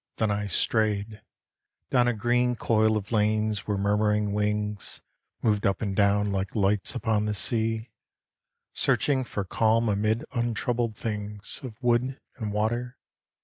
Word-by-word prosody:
Then 110 -2 +1
I 100 0 -1
strayed 105 +1 0 0.7
Down 125 -2 +4
a 120 - +2
green 120 +3 +1
coil 110 -1 +2
of 105 +1 -6
lanes 105 -1 +1
where 105 -1 0
murmuring 105 +1 +1
wings 105 0 -2 0.4
Moved 105 -2 +2
up 95 -2 0
and 100 -3 -2
down 100 0 +3
like 95 +2 -2
lights 100 0 +1
upon 110 -4 0
the 105 0 -1
sea, 110 0 0 0.8
Searching 135 -3 +1
for 105 -4 -4
calm 115 +4 +2
amid 110 +2 0
untroubled 120 -1 -1
things 105 -1 -4
Of 115 -3 -9
wood 125 +2 +1 0.2
and 110 -4 -3
water. 120 +4 -1
110 Hz, 140 wpm, -27 LUFS, 105-115 Hz, 0.8 s, Down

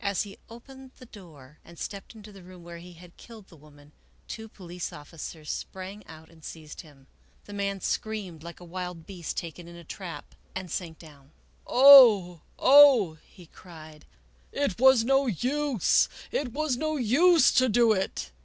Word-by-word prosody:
As 200 -2 -1
he 200 -2 -13
opened 265 +3 -14
the 255 - -14
door 155 - -16
and 170 0 -17
stepped 200 +5 -8
into 215 -1 -13
the 195 -1 -15
room 180 -1 -15
where 170 0 -11
he 175 +1 -13
had 175 0 -17
killed 220 -4 -15
the 170 - -17
woman, 145 -1 -20 0.4
two 220 -1 -9
police 180 -3 -8
officers 155 +1 -9
sprang 190 +2 -8
out 160 0 -14
and 160 -1 -21
seized 155 -1 -10
him. 145 -4 -20 0.4
The 205 - -12
man 200 -1 -4
screamed 200 -8 -5
like 170 +1 -11
a - - -14
wild 180 -1 -8
beast 180 -5 -8
taken 170 +1 -7
in 170 - -13
a 170 - -13
trap 175 +1 -10 0.2
and 185 -3 -7
sank 165 -3 -6
down. 145 -4 -17 0.3
" - - -31
Oh! 235 - +7 0.2
oh! 260 - +5
" - - -29
he 180 - -15
cried, 155 -3 -15 0.3
" - - -35
it 230 -7 -2
was 260 -2 +5
no 270 +2 +1
use! 255 - 0 0.2
it 260 -4 -3
was 285 -1 -2
no 310 +2 -3
use 305 +8 +3
to 255 0 +2
do 230 +1 +3
it 190 - -3
185 Hz, 180 wpm, -26 LUFS, 165-235 Hz, 0.4 s, Oh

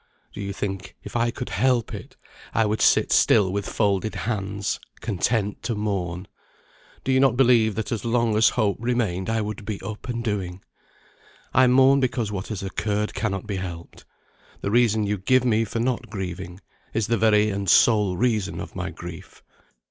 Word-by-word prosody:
Do 100 - -7
you 100 0 -3
think 95 -1 -5
if - - -10
I 120 0 +2
could 125 +1 -5
help 125 -3 +1
it, - - -8 0.4
I 115 - +3
would 105 +1 -1
sit - - +4
still 95 -3 +4
with 100 0 -2
folded 105 0 0
hands, 100 -3 -2 0.2
content 105 0 -1
to 115 0 -2
mourn? 95 -3 -3 0.8
Do 135 - 0
you 130 - +4
not 130 -2 +3
believe 120 -5 +4
that 110 0 -3
as 110 -4 -2
long 115 -1 +1
as 110 0 +5
hope 100 -2 +2
remained 115 -6 -1
I 115 0 +1
would 105 0 -5
be 100 -1 -4
up 110 +3 -7
and 120 -1 -3
doing? 95 -4 -3 0.9
I 130 0 +6
mourn 135 +2 +5
because 120 -5 -1
what 95 -2 -4
has 105 -3 -5
occurred 105 +2 -2
cannot 100 -1 -2
be 100 -2 -3
helped. 85 -2 -7 0.6
The 100 - -2
reason 110 -2 +3
you 105 -1 -1
give 125 +7 +3
me 115 -2 +2
for 115 - -4
not 120 +1 -1
grieving, 95 -2 -6 0.3
is 110 -1 +1
the 115 - +1
very 105 -1 +4
and 100 -1 -2
sole 105 -2 +4
reason 110 -4 0
of - - -8
my - - -3
grief. - - -10
105 Hz, 180 wpm, -24 LUFS, 100-115 Hz, 0.9 s, I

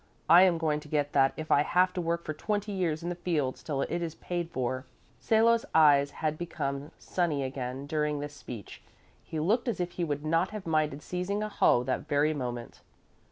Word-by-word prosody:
I 170 +3 +8
am 185 -3 +5
going 155 -2 0
to 150 - -13
get 145 -1 -1
that 135 -1 +4
if 155 0 -5
I 145 - +6
have 180 +4 +2
to 180 - -2
work 170 0 -2
for 155 - -3
twenty 205 +4 -2
years 170 -5 -1
in 175 - -2
the - - -1
fields 150 -8 -1
till 140 -3 -2
it 175 - -2
is 165 -2 -4
paid 175 -1 -4
for." 130 -2 -3 0.3
Salo's 230 +1 +3
eyes 145 -3 +6
had 155 +1 -3
become 140 -4 -3
sunny 160 -6 -1
again 130 0 -4
during 150 0 -1
this 145 0 -5
speech. 125 -7 -9 0.4
He 160 - -5
looked 220 - +1
as 230 -6 -1
if 175 0 -2
he 175 - -3
would 145 -2 -2
not 165 +4 +2
have 215 -2 -7
minded 155 -3 0
seizing 190 +4 -2
a 215 - -3
hoe 120 -10 +3
that 130 0 -2
very 145 +2 +2
moment. 120 -4 -5
155 Hz, 205 wpm, -29 LUFS, 145-175 Hz, 0.4 s, I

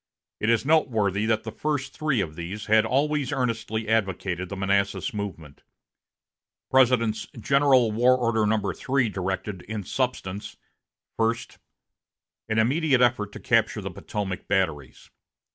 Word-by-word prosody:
It 105 - 0
is 115 +2 +2
noteworthy 110 - +2
that 110 -1 +1
the 110 - -5
first 145 +2 -3
three 155 -8 0
of 80 -5 -5
these 90 +5 -6
had 110 +1 +4
always 145 +1 0
earnestly 115 -4 -2
advocated 95 -4 -1
the 100 - -5
Manassas 100 -1 0
movement. 85 -8 -6 1.1
President's 120 -4 +3
General 135 -2 +4
War 125 +4 +4
Order 115 -3 +1
No. 110 0 +1
3 130 -3 0
directed, 95 0 -3
in 105 0 -5
substance: 105 -4 -3 0.6
First. 115 +2 -1 0.9
An 110 - 0
immediate 130 +3 +3
effort 115 -4 +2
to - - -8
capture - - +1
the - - -5
Potomac 95 -3 -5
batteries. 80 -9 -2
110 Hz, 130 wpm, -25 LUFS, 100-125 Hz, 1.1 s, had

